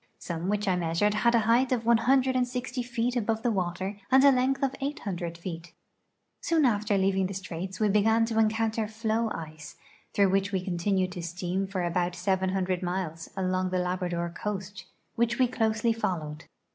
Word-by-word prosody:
Some 170 Hz, +1 st, -4 dB
which 210 Hz, 0 st, 0 dB
I 185 Hz, -, +3 dB
measured 175 Hz, +4 st, +1 dB
had 235 Hz, +3 st, +3 dB
a 230 Hz, -, +4 dB
height 245 Hz, +3 st, +3 dB
of 235 Hz, -3 st, 0 dB
160 250 Hz, +1 st, +2 dB
feet 240 Hz, 0 st, -2 dB
above 225 Hz, -1 st, -1 dB
the 240 Hz, -, +2 dB
water 190 Hz, +1 st, -2 dB
and 265 Hz, +1 st, +6 dB
a 280 Hz, -, +8 dB
length 265 Hz, +1 st, +1 dB
of 270 Hz, -1 st, 0 dB
800 185 Hz, -, -4 dB
feet. 170 Hz, 0 st, -7 dB, 0.7 s
Soon 325 Hz, -3 st, +2 dB
after 210 Hz, -3 st, +2 dB
leaving 190 Hz, 0 st, +2 dB
the 195 Hz, -, -6 dB
straits 185 Hz, 0 st, -6 dB
we 215 Hz, -, +3 dB
began 220 Hz, +3 st, +3 dB
to 225 Hz, -1 st, -1 dB
encounter 220 Hz, 0 st, +1 dB
floe 225 Hz, +1 st, -1 dB
ice, 155 Hz, -1 st, -8 dB, 0.4 s
through 200 Hz, -1 st, +4 dB
which 195 Hz, +1 st, +1 dB
we 185 Hz, -2 st, -2 dB
continued 185 Hz, +1 st, 0 dB
to 180 Hz, -1 st, -6 dB
steam 180 Hz, +3 st, -3 dB
for 190 Hz, -2 st, -2 dB
about 175 Hz, +1 st, 0 dB
700 185 Hz, 0 st, 0 dB
miles, 175 Hz, -3 st, -3 dB
along 185 Hz, 0 st, 0 dB
the 185 Hz, -, -1 dB
Labrador 180 Hz, -1 st, -2 dB
coast, 195 Hz, 0 st, -5 dB, 0.3 s
which 235 Hz, 0 st, +1 dB
we 255 Hz, -, +4 dB
closely 225 Hz, -1 st, +1 dB
followed. 160 Hz, -8 st, -3 dB
195 Hz, 170 wpm, -28 LUFS, 180-230 Hz, 0.7 s, a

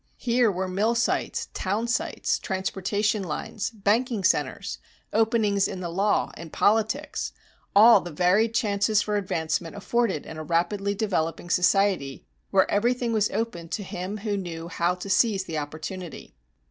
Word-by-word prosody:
Here 240 Hz, -2 st, +2 dB
were 190 Hz, 0 st, -2 dB
mill 205 Hz, +6 st, +1 dB
sites, 240 Hz, -, -1 dB
town 205 Hz, +5 st, -1 dB
sites, 235 Hz, -, -1 dB
transportation 200 Hz, +3 st, -1 dB
lines, 180 Hz, +4 st, -4 dB
banking 220 Hz, +1 st, 0 dB
centers, -, -, 0 dB, 0.3 s
openings 220 Hz, -3 st, +2 dB
in 185 Hz, -, -6 dB
the 175 Hz, -2 st, -4 dB
law, 200 Hz, +4 st, +1 dB
in 165 Hz, -1 st, -9 dB
politics 220 Hz, -, 0 dB, 0.4 s
all 215 Hz, 0 st, +8 dB
the 175 Hz, -, -7 dB
varied 185 Hz, +8 st, +2 dB
chances 210 Hz, -1 st, +2 dB
for 210 Hz, -, -2 dB
advancement 165 Hz, -3 st, -2 dB
afforded 205 Hz, -4 st, 0 dB
in 160 Hz, -, -8 dB
a 155 Hz, -, -5 dB
rapidly 180 Hz, +5 st, 0 dB
developing 175 Hz, -5 st, -2 dB
society 180 Hz, -6 st, +2 dB, 0.2 s
where 190 Hz, -1 st, +3 dB
everything 240 Hz, +3 st, +1 dB
was 210 Hz, -2 st, +2 dB
open 195 Hz, -6 st, -3 dB
to 205 Hz, -, -3 dB
him 185 Hz, +2 st, -5 dB
who 205 Hz, -2 st, 0 dB
knew 170 Hz, -3 st, -6 dB
how 175 Hz, +1 st, 0 dB
to 180 Hz, +2 st, -8 dB
seize 200 Hz, -1 st, +2 dB
the 160 Hz, -4 st, -3 dB
opportunity. 155 Hz, +4 st, -7 dB
200 Hz, 145 wpm, -26 LUFS, 175-220 Hz, 0.4 s, all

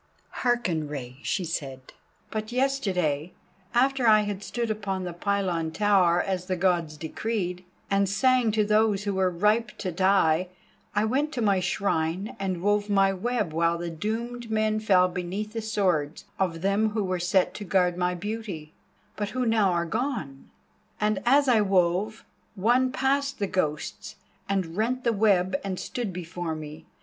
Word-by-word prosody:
"Hearken, 200 Hz, -11 st, +1 dB
Rei," 130 Hz, -4 st, -7 dB
she 185 Hz, -, -1 dB
said; 135 Hz, -6 st, -5 dB, 0.4 s
"but 215 Hz, +1 st, -4 dB
yesterday, 185 Hz, -, 0 dB, 0.4 s
after 260 Hz, 0 st, +2 dB
I 215 Hz, -1 st, +7 dB
had 205 Hz, -2 st, -3 dB
stood 220 Hz, +4 st, -2 dB
upon 195 Hz, -3 st, -3 dB
the 175 Hz, -1 st, -4 dB
pylon 180 Hz, -3 st, -1 dB
tower 185 Hz, -2 st, +3 dB
as 185 Hz, -1 st, -2 dB
the 185 Hz, -, 0 dB
Gods 170 Hz, -4 st, 0 dB
decreed, 180 Hz, +2 st, -3 dB, 0.3 s
and 195 Hz, -1 st, +2 dB
sang 250 Hz, +3 st, +3 dB
to 215 Hz, -1 st, +2 dB
those 210 Hz, -1 st, +2 dB
who 200 Hz, -1 st, -1 dB
were 190 Hz, -1 st, +2 dB
ripe 210 Hz, +5 st, +1 dB
to 185 Hz, -, -3 dB
die, 185 Hz, -2 st, +3 dB, 0.5 s
I 210 Hz, +1 st, +3 dB
went 280 Hz, +7 st, 0 dB
to 245 Hz, -, -2 dB
my 200 Hz, -3 st, +3 dB
shrine 180 Hz, 0 st, -1 dB
and 185 Hz, -3 st, -2 dB
wove 205 Hz, 0 st, +1 dB
my 195 Hz, -1 st, +4 dB
web 210 Hz, -3 st, -1 dB
while 165 Hz, +1 st, +2 dB
the 170 Hz, 0 st, -4 dB
doomed 230 Hz, +7 st, -4 dB
men 215 Hz, 0 st, +1 dB
fell 190 Hz, -4 st, +4 dB
beneath 180 Hz, +4 st, -4 dB
the 225 Hz, -, -3 dB
swords 180 Hz, -8 st, 0 dB
of 170 Hz, -4 st, -1 dB
them 200 Hz, +3 st, +2 dB
who 215 Hz, -2 st, 0 dB
were 185 Hz, -1 st, -1 dB
set 180 Hz, +1 st, +2 dB
to 210 Hz, -, -6 dB
guard 180 Hz, -2 st, +2 dB
my 180 Hz, 0 st, 0 dB
beauty, 190 Hz, -5 st, -5 dB, 0.4 s
but 205 Hz, -1 st, -3 dB
who 255 Hz, +2 st, -1 dB
now 220 Hz, -4 st, +3 dB
are 170 Hz, -1 st, 0 dB
gone. 170 Hz, -, -3 dB, 0.5 s
And 210 Hz, -1 st, +1 dB
as 280 Hz, +3 st, +5 dB
I 235 Hz, -4 st, +5 dB
wove, 195 Hz, +2 st, +1 dB, 0.3 s
one 245 Hz, +6 st, +2 dB
passed 275 Hz, +1 st, 0 dB
the 200 Hz, -, 0 dB
Ghosts 155 Hz, -6 st, -3 dB, 0.3 s
and 185 Hz, -4 st, -1 dB
rent 245 Hz, +5 st, 0 dB
the 235 Hz, -, +2 dB
web 190 Hz, -3 st, +3 dB
and 190 Hz, -2 st, -3 dB
stood 240 Hz, -5 st, -4 dB
before 175 Hz, -2 st, -4 dB
me. 155 Hz, +1 st, -9 dB
195 Hz, 165 wpm, -26 LUFS, 175-220 Hz, 0.5 s, I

